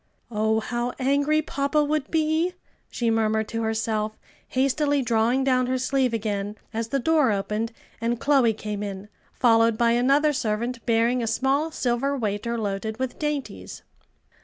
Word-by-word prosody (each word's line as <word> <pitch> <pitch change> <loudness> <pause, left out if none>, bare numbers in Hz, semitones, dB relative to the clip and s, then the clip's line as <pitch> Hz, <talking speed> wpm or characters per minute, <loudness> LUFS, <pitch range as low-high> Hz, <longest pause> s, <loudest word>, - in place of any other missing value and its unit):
"Oh, 220 0 +1
how 240 +2 -2
angry 285 +3 +2
papa 285 +1 0
would 295 -1 -1
be!" 320 +3 +1 0.3
she 235 -2 0
murmured 220 -1 +1
to 230 - -3
herself, 220 -1 -1 0.3
hastily 280 +2 +1
drawing 235 +3 +2
down 255 -2 +2
her 260 0 0
sleeve 260 -1 +1
again 210 -2 -2 0.2
as 225 0 -2
the 275 - -1
door 295 -1 +3
opened 210 +3 -2 0.3
and 230 0 -1
Chloe 270 -5 +3
came 210 -1 -5
in, 200 0 -6 0.2
followed 230 -2 +3
by 235 0 +3
another 275 +5 +3
servant 235 0 -2
bearing 235 +2 +2
a 230 - -2
small 275 +7 +1
silver 275 -1 -1
waiter 220 +1 -2
loaded 215 0 -3
with 260 0 -4
dainties. 295 -3 -4
240 Hz, 150 wpm, -25 LUFS, 220-275 Hz, 0.3 s, door